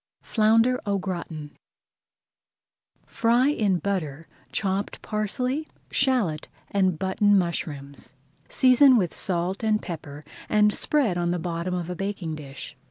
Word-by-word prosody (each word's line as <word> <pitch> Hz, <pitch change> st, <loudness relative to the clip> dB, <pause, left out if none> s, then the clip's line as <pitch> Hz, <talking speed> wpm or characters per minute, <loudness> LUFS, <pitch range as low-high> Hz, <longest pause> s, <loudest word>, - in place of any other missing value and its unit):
FLOUNDER 225 Hz, +3 st, +3 dB
AU 200 Hz, -2 st, 0 dB
GRATIN 170 Hz, -5 st, -5 dB, 1.5 s
Fry 240 Hz, +4 st, +2 dB
in 210 Hz, -10 st, +1 dB
butter 165 Hz, -6 st, -3 dB, 0.3 s
chopped 195 Hz, 0 st, -2 dB
parsley, 250 Hz, +8 st, -1 dB, 0.2 s
shallot, 240 Hz, -, +1 dB, 0.2 s
and 190 Hz, -4 st, +2 dB
button 200 Hz, +3 st, +3 dB
mushrooms. 140 Hz, -, -3 dB, 0.4 s
Season 255 Hz, 0 st, +6 dB
with 180 Hz, -6 st, 0 dB
salt 180 Hz, +1 st, -2 dB
and 215 Hz, -1 st, +2 dB
pepper 150 Hz, -5 st, -8 dB, 0.3 s
and 210 Hz, 0 st, +4 dB
spread 240 Hz, -13 st, +1 dB
on 175 Hz, 0 st, 0 dB
the 175 Hz, -, 0 dB
bottom 170 Hz, +1 st, -3 dB
of 175 Hz, -2 st, -3 dB
a 180 Hz, -, -4 dB
baking 195 Hz, -3 st, -4 dB
dish. 140 Hz, -3 st, -8 dB
190 Hz, 120 wpm, -25 LUFS, 170-215 Hz, 1.5 s, Season